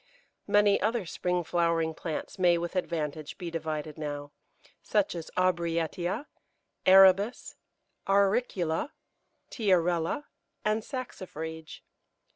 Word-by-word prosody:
Many 205 -1 +4
other 220 0 0
spring 180 +1 -1
flowering 165 -1 +1
plants 160 +3 -5
may 175 -2 +4
with 170 +2 -4
advantage 155 -4 -3
be 175 -3 -5
divided 155 -1 -4
now, 145 -1 -5 0.5
such 205 -2 +1
as 165 -2 -6
Aubrietia, 170 - 0 0.6
Arabis, 195 +4 +6 0.6
Auricula, 195 - +1 0.6
Tiarella, 180 - +1 0.4
and 215 +1 +2
Saxifrage. 160 - -7
175 Hz, 90 wpm, -29 LUFS, 160-195 Hz, 0.6 s, Arabis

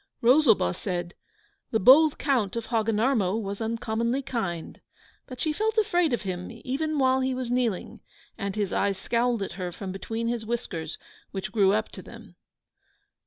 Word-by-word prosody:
Rosalba 235 - +5
said, 175 -2 -4 0.6
'The 220 - +1
bold 280 +8 +7
Count 245 -9 0
of 230 -1 -3
Hogginarmo 220 -2 +1
was 200 0 -5
uncommonly 230 +3 -1
kind.' 195 -11 -4 0.5
But 255 -3 -9
she 310 - 0
felt 435 +6 -1
afraid 355 -7 +2
of 240 - -1
him, 180 -2 -4
even 305 +4 -1
while 260 -1 +3
he 260 0 0
was 255 -2 -3
kneeling, 240 -6 -1 0.4
and 200 -1 -4
his 205 -3 -1
eyes 200 -1 +1
scowled 235 +1 0
at - - -5
her 180 -1 -3
from 190 +2 -6
between 225 +4 -4
his 235 -1 -1
whiskers, 190 -9 -4 0.3
which 195 -1 -5
grew 200 -3 +4
up 215 +1 0
to - - -10
them. - - -13
230 Hz, 165 wpm, -26 LUFS, 195-260 Hz, 0.6 s, bold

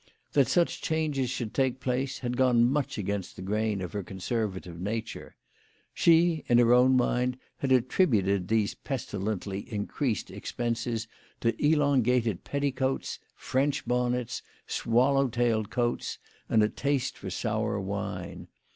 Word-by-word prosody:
That 140 -4 +4
such 175 +5 +1
changes 150 -5 0
should 120 -4 -3
take 130 -2 +1
place 130 +1 -1
had 125 -1 -2
gone 125 -2 +4
much 135 0 -1
against 100 -2 -3
the 90 - -8
grain 105 0 -1
of 90 - -6
her 105 - -2
conservative 95 -2 -4
nature. 110 +3 -4 0.6
She, 165 -1 +4
in 120 - +6
her 120 0 +6
own 130 +1 +5
mind, 125 0 +1 0.2
had 135 - -2
attributed 110 - +2
these 110 0 +1
pestilently 100 -6 -4
increased 105 +2 -2
expenses 115 -1 -3 0.3
to 115 0 +2
elongated 125 - +2
petticoats, 135 -2 -1 0.2
French 140 +2 0
bonnets, 125 0 0 0.2
swallow 135 +4 +2
tailed 115 -3 0
coats, 120 +3 -1 0.3
and 110 -1 +4
a - - +4
taste 140 +2 -1
for 95 - -7
sour 110 +2 -1
wine. 95 -2 -5
120 Hz, 130 wpm, -28 LUFS, 105-130 Hz, 0.6 s, in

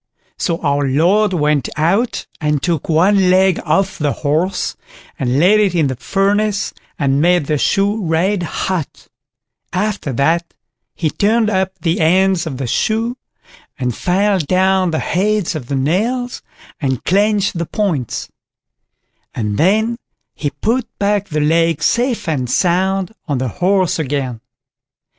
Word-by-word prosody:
So 170 -2 -1
our 145 -1 +1
Lord 180 +10 +3
went 150 -5 +1
out 195 +10 +1
and 150 -3 0
took 170 -4 -1
one 185 +4 +4
leg 185 0 +4
off 195 -1 0
the 145 -2 +1
horse, 160 +7 0 0.4
and 125 0 0
laid 190 +8 +5
it 200 -4 +2
in 160 -3 +3
the 130 -1 -1
furnace, 200 - 0 0.2
and 140 -1 +1
made 175 -2 +3
the 150 0 0
shoe 205 +5 +1
red 180 +4 +1
hot; 175 -1 -4 0.6
after 205 -5 -2
that, 165 +7 0 0.4
he 155 -3 -1
turned 220 +1 +2
up 190 -1 -1
the 165 -1 0
ends 180 +1 +2
of 135 -5 -5
the 135 - -3
shoe, 225 - 0 0.6
and 125 -3 -2
filed 190 -2 +1
down 185 0 +2
the 160 - -1
heads 205 +2 0
of 145 -7 -6
the 140 - -2
nails, 225 - -1 0.4
and 130 -3 -1
clenched 200 -1 +1
the 170 - -2
points; 165 - -2 1.1
and 105 -3 -2
then 220 +7 +2 0.3
he 145 - -3
put 225 - -1
back 205 0 0
the 150 -3 -1
leg 165 0 +2
safe 240 - +1
and 130 -6 -1
sound 190 - +1
on 145 -4 -1
the 130 0 -2
horse 185 -2 +2
again. 135 -6 -2
180 Hz, 145 wpm, -17 LUFS, 150-200 Hz, 1.1 s, laid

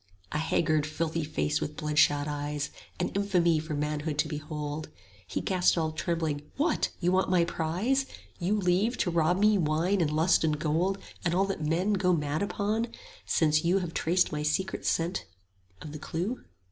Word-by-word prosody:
A 150 - -1
haggard 155 -1 +1
filthy 160 +1 -2
face 150 0 -1
with 150 - -3
bloodshot 150 -2 +3
eyes, 145 0 -3 0.3
25 - - -27
An 180 - 0
infamy 175 -5 +3
for 155 0 -4
manhood 150 +1 -2
to 145 - +2
behold. 150 0 -5 0.4
He - - -2
gasped 185 -2 +2
all 160 -1 0
trembling, 160 -2 -1 0.2
What, 310 +3 +1
you 180 0 +1
want 190 +1 +2
my 180 -2 +4
prize? 190 +13 0 0.3
You 190 +4 +1
leave, 195 +6 +2
to 175 - 0
rob 170 +1 +2
me, 210 0 +4
wine 170 +5 +1
and 160 - +2
lust 160 +4 +3
and 155 -2 +1
gold 165 +6 0 0.3
And 175 0 +1
all 195 +2 +3
that 195 -4 -3
men 175 +7 +1
go 185 -2 +2
mad 150 -2 -1
upon, 210 +3 -1 0.4
since 155 -1 +3
you 175 +3 +3
Have 175 -4 -3
traced 180 +3 +2
my 150 -1 -2
sacred 170 +5 -1
secret 170 +3 0 0.6
of 150 - -7
the 155 - -7
clue? 180 - -3
165 Hz, 180 wpm, -29 LUFS, 150-185 Hz, 0.6 s, my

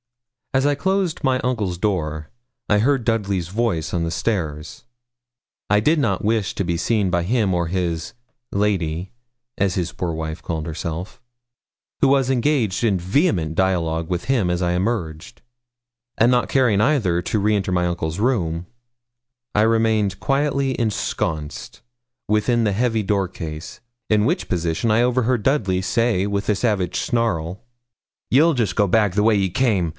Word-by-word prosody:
As 135 +1 +2
I 145 - +3
closed 190 +1 -1
my 130 -2 +2
uncle's 105 -8 -1
door, 80 -6 -2 0.4
I 105 - +3
heard 130 +1 +1
Dudley's 100 -6 0
voice 95 -5 -1
on 85 -2 0
the 85 - -2
stairs. 80 -8 -3 0.9
I 105 - +4
did 150 +10 +2
not 100 -8 0
wish 110 -3 0
to 100 - -1
be 85 -1 0
seen 100 +2 +1
by 85 -1 +1
him 105 -1 +1
or 85 -1 0
by - - -7
his 90 +1 -2 0.4
'lady', 95 -4 -1 0.5
as 95 -2 +1
his 90 -2 -2
poor 90 -2 -3
wife 80 0 -5
called 80 -3 -4
herself, 85 +3 -5 0.8
who - - +5
was 135 -2 +3
engaged 125 -6 +1
in 100 -5 +2
vehement 90 - +1
dialogue 85 -3 0
with 90 -1 -2
him 120 -9 +1
as 90 0 -1
I 90 -1 +1
emerged, 90 -5 -3 0.8
and 120 +3 +4
not 125 -1 +2
caring 120 -7 +3
either 105 - +2
to 105 - -1
re 105 +1 +2
enter 100 -2 -1
my 90 -1 +1
uncle's 85 0 -2
room, 90 -9 0 0.9
I 105 - +4
remained 110 -3 +2
quietly 140 -1 0
ensconced 80 - -3 0.5
within 110 +3 +2
the 105 - +1
heavy 115 0 0
door 100 -2 0
case, 80 -2 -7 0.3
in 105 -1 +3
which - - -1
position 85 +5 0
I 115 +2 +4
overheard 125 -2 +1
Dudley 100 -10 +1
say 100 0 +1
with 100 0 -2
a 105 - +3
savage 100 -5 0
snarl 95 -6 -1 0.7
'You'll 155 +5 +4
jest 110 -7 0
go 105 -2 +3
back 105 -1 +2
the 105 +2 +2
way 110 0 +4
ye 95 -2 +1
came. 95 -5 +1
100 Hz, 160 wpm, -21 LUFS, 85-115 Hz, 0.9 s, who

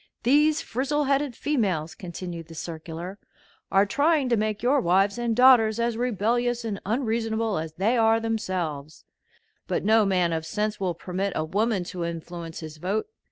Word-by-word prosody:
"These 300 +5 +3
frizzle 275 +5 -1
headed 275 -2 0
females," 190 - -1
continued 170 -1 -7
the 165 - -11
circular, 165 +4 -7 0.5
"are 195 +1 +5
trying 285 +5 +2
to 235 - +3
make 215 0 -1
your 270 +3 +3
wives 195 +4 +2
and 235 -2 0
daughters 235 -3 +6
as 235 0 0
rebellious 240 +1 0
and 210 -3 -4
unreasonable 225 - 0
as 160 0 -5
they 210 +9 +1
are 225 0 +4
themselves; 180 -10 -3 0.6
but - - -1
no 220 +1 +5
man 180 -4 +1
of 160 -1 -2
sense 210 +5 -2
will 185 -3 -1
permit 185 +3 -3
a 155 - -1
woman 205 +3 0
to 175 0 -5
influence 170 0 -6
his 155 -1 -8
vote. 200 - -2
210 Hz, 160 wpm, -25 LUFS, 175-240 Hz, 0.6 s, daughters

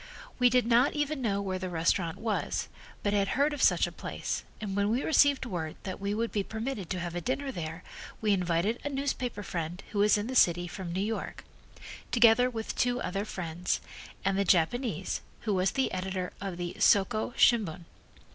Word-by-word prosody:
We 250 -1 +6
did 250 0 +3
not 240 +3 +4
even 295 -1 -1
know 200 -4 0
where 185 -1 -2
the 185 0 -4
restaurant 165 0 0
was 220 -2 -2 0.3
but 205 - +1
had 200 -1 +2
heard 290 +2 +3
of 290 - -4
such - - +5
a - - -5
place, - - -4 0.2
and 200 -3 -4
when 200 0 +2
we 240 +5 +1
received 285 -4 +4
word 165 -8 -4
that 185 -2 -5
we 200 +1 -1
would 230 +1 -1
be 205 - 0
permitted 220 -2 -4
to 185 - -2
have 175 -1 -4
a 175 - -3
dinner 270 +4 -2
there 165 -4 -6 0.4
we 215 -2 +2
invited 180 +4 0
a 290 - -2
newspaper 260 -6 -2
friend 175 0 -4
who 205 - -2
was 210 +1 +5
in 205 - -2
the 260 +3 -4
city 175 -5 +4
from 180 -1 -6
New 185 +2 -1
York, 225 +1 -4 0.7
together 235 +1 +6
with 225 -3 -5
two 245 0 +1
other 200 -1 -2
friends 175 -3 -2 0.5
and 195 0 +2
the - - +3
Japanese, 200 +8 +1 0.2
who 215 -3 -1
was 185 0 +2
the 265 -1 0
editor 185 0 -3
of 195 -3 -4
the 175 -1 -4
Soko 215 +4 +3
Shimbun. 195 -8 +3
205 Hz, 195 wpm, -29 LUFS, 180-245 Hz, 0.7 s, We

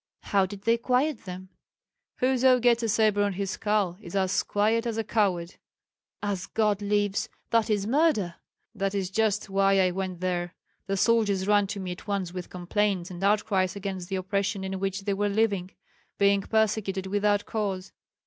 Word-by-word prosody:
"How 195 -2 +2
did 200 0 -9
they 230 0 +3
quiet 255 +2 0
them?" 185 0 -8 0.7
"Whoso 255 0 +3
gets 240 -1 +3
a 230 - -1
sabre 215 -1 +3
on 205 -1 +1
his 195 0 -3
skull 205 -4 0
is 175 -2 -9
as 190 -1 +2
quiet 220 +3 +1
as 225 -1 -2
a 225 - 0
coward." 195 -5 0 0.7
"As 195 -2 -2
God 210 -2 +1
lives, 205 -1 0 0.2
that 230 -1 +3
is 205 -2 +1
murder!" 245 - +2 0.4
"That 195 -2 -2
is 190 -1 -2
just 215 0 +1
why 195 0 +3
I 185 -1 +3
went 185 -1 -4
there. 175 -1 -2 0.3
The 195 0 -1
soldiers 205 -3 +2
ran 205 0 +3
to 200 0 -5
me 185 -2 -4
at 180 - -9
once 195 -4 -2
with 180 -1 -6
complaints 185 0 -1
and 180 +1 -7
outcries 200 -2 +2
against 190 -2 -5
the 195 - -1
oppression 195 +1 -1
in 190 0 -3
which 195 0 -2
they 200 0 -1
were 205 +1 0
living, 200 -3 +1 0.5
being 200 0 +4
persecuted 205 -3 0
without 205 +1 +1
cause. 195 -3 -3
200 Hz, 175 wpm, -27 LUFS, 190-215 Hz, 0.7 s, being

